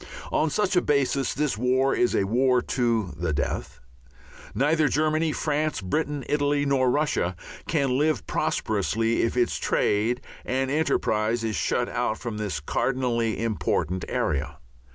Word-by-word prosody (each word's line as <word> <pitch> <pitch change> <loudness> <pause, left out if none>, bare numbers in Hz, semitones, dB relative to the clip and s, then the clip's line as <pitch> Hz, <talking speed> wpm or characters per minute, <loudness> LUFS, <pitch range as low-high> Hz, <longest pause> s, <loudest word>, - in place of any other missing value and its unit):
On 155 - +2
such 200 +3 0
a 180 - +5
basis 140 -1 +1
this 145 -7 -1
war 130 +2 +2
is 120 - +2
a - - +2
war 125 +5 +3
to 115 -8 0
the 80 +1 -2
death. 70 -1 -3 0.8
Neither 150 +3 +3
Germany, 155 +2 +1
France, 150 0 -1
Britain, 145 - -2
Italy, 145 0 +1
nor 135 -2 +2
Russia 125 - 0 0.3
can 140 -5 +1
live 155 +1 +1
prosperously 110 +2 0
if 115 - 0
its 120 -1 +2
trade 110 +4 +1 0.2
and 130 +1 -1
enterprise 115 -7 +1
is 110 -2 -1
shut 75 - 0
out 110 - -1
from 115 -4 -5
this 100 -9 -2
cardinally 115 - -1
important 95 -5 -1
area. 70 -1 -1
125 Hz, 140 wpm, -25 LUFS, 110-145 Hz, 0.8 s, a